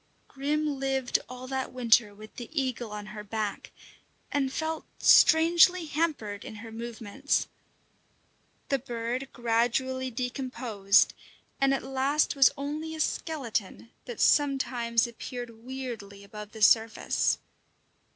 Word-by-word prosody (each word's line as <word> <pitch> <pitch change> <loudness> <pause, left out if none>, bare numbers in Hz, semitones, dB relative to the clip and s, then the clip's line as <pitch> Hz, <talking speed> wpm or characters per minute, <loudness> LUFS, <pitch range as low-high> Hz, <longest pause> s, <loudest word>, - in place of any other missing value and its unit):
Grim 290 +1 -1
lived 265 -2 0
all 250 0 -8
that 265 0 -3
winter 235 -3 +3
with 215 +1 -13
the 240 - -7
eagle 250 -3 -2
on 210 0 -6
her 210 -1 -7
back, 210 0 -4 0.6
and 275 -2 0
felt 320 +2 -3
strangely 340 +2 +6
hampered 295 -10 -2
in - - -8
her 225 +2 -9
movements. 235 +4 -2 1.2
The 275 - +1
bird 240 +1 -4
gradually 245 +2 0
decomposed, 245 -5 +1 0.5
and 275 0 +3
at 275 - 0
last 270 +3 +1
was 275 -2 +7
only 305 +3 -4
a - - -8
skeleton 235 - -3
that 240 -3 -7
sometimes 255 -5 +2
appeared 235 -1 -8
weirdly 235 -6 -7
above 210 +1 -10
the 220 -1 -3
surface. 225 +1 +3
250 Hz, 120 wpm, -28 LUFS, 225-275 Hz, 1.2 s, was